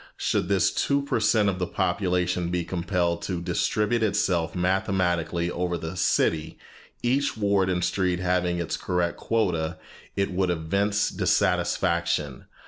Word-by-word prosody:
Should - - 0
this 100 -1 +2
two 140 0 +1
per 140 -4 -1
cent 105 -1 +3
of 95 -2 0
the 90 - -1
population 90 -2 0
be 90 0 -1
compelled 85 0 -1
to 90 -3 -3
distribute 105 +6 0
itself 90 -6 +1
mathematically 90 -2 0
over 90 0 -1
the 80 +2 -6
city, 80 -3 +1 0.5
each 135 +1 +1
ward 100 -3 +2
and 90 -1 0
street 90 0 +1
having 90 -1 0
its 85 -1 -2
correct 90 -2 -1
quota, 90 -7 -1 0.4
it 100 0 0
would 95 0 0
evince 100 +5 0
dissatisfaction. 85 -5 0
90 Hz, 135 wpm, -26 LUFS, 85-100 Hz, 0.5 s, cent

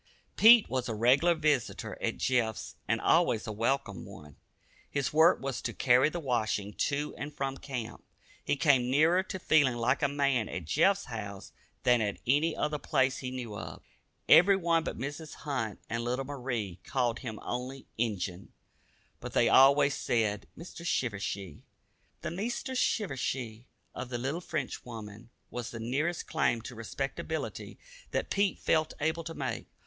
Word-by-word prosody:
Pete 225 0 +8
was 130 -1 -2
a 110 - -2
regular 135 +10 +4
visitor 150 -5 0
at - - -1
Jeff's 115 -4 -1
and - - +1
always 110 - +3
a 110 - -4
welcome 115 -2 -1
one. 75 -2 -12 0.5
His 140 -1 -2
work 160 +3 +6
was 135 -2 -3
to - - -3
carry 125 +3 +4
the 175 - -4
washing 110 -7 -1 0.2
to 145 +1 -2
and 150 +2 -5
from 135 -2 -3
camp. 125 -5 -6 0.4
He - - +1
came 135 -5 +3
nearer 160 +7 +4
to 190 0 -6
feeling 145 -8 +3
like 120 +3 +1
a 140 - +3
man 140 -5 +1
at 90 -3 -5
Jeff's 195 - +2
house 100 -5 -7 0.3
than 120 -2 +4
at 105 -2 -1
any 150 +5 +2
other 150 0 -1
place 135 -2 +1
he 130 - -4
knew 125 -4 -6
of. 80 -5 -8 0.4
Everyone 170 -3 +5
but - - -4
Mrs. 145 +5 -6
Hunt 120 -8 -3
and 115 0 -2
little 125 +3 -2
Marie 125 -9 -4
called 125 -3 0
him 115 -4 -6
only 125 +2 -5
"Injun," 100 -5 -3 0.7
but - - -7
they - - +4
always 140 +1 +6
said 110 -5 -1
"Mr. 170 +1 -9
Shivershee." 100 - -2 0.6
The - - -4
"Meester 240 - -3
Shivershee" 135 - -1 0.3
of 125 -1 -6
the 120 - -2
little 135 +8 -3
Frenchwoman 120 - -6 0.2
was 120 -1 -4
the 115 - -7
nearest 145 +9 -1
claim 115 - +1
to 125 - -7
respectability 135 +7 -5 0.3
that - - -2
Pete 200 -1 +1
felt 155 -1 +1
able 160 +2 0
to 165 -1 -6
make. - - -4
130 Hz, 155 wpm, -30 LUFS, 115-155 Hz, 0.7 s, Pete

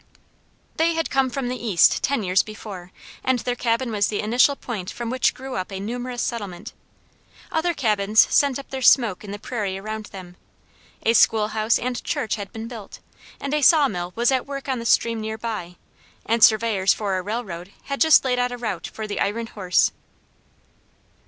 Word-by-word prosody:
They 330 +1 +2
had 325 0 -2
come 270 -1 +2
from 260 0 -3
the 250 -1 -4
East 200 -8 +4
ten 275 -5 0
years 185 0 +3
before, 200 -4 -9 0.3
and 260 -1 +2
their 245 +1 -2
cabin 235 0 -1
was 205 -2 +1
the 210 - -2
initial 245 +6 +3
point 210 -9 -6
from 235 -1 -5
which 255 0 +1
grew 265 0 -7
up 185 +2 -4
a 190 - -5
numerous 245 +4 -4
settlement. 200 -7 -5 0.8
Other 335 +1 0
cabins 215 -4 +1
sent 280 -3 +3
up 275 - -10
their 265 -1 -4
smoke 235 -7 +4
in 205 - -9
the 205 - -5
prairie 205 -3 -4
around 215 +2 -6
them. 180 -2 -11 0.7
A 225 - +3
school 215 -2 +4
house 220 +1 +1
and 245 -1 -3
church 220 - -2
had 205 -2 -5
been 225 -1 -7
built, 230 -4 -9 0.4
and 280 +1 -4
a 300 - +1
saw 300 -1 +6
mill 180 -5 -4
was 235 +2 +2
at 260 0 0
work 275 0 -6
on 260 -2 -1
the 230 - -4
stream 230 -1 +2
near 220 0 -4
by, 215 -6 -5 0.5
and 230 0 +2
surveyors 215 -3 +4
for 200 -3 -2
a - - -3
railroad 195 -4 -5
had 275 0 -5
just 315 -3 +6
laid 250 -1 +1
out 245 0 0
a 245 - -5
route 235 -2 -4
for 220 - -7
the 210 - -4
iron 225 +3 -1
horse. 190 -5 +1
225 Hz, 195 wpm, -23 LUFS, 205-250 Hz, 0.8 s, saw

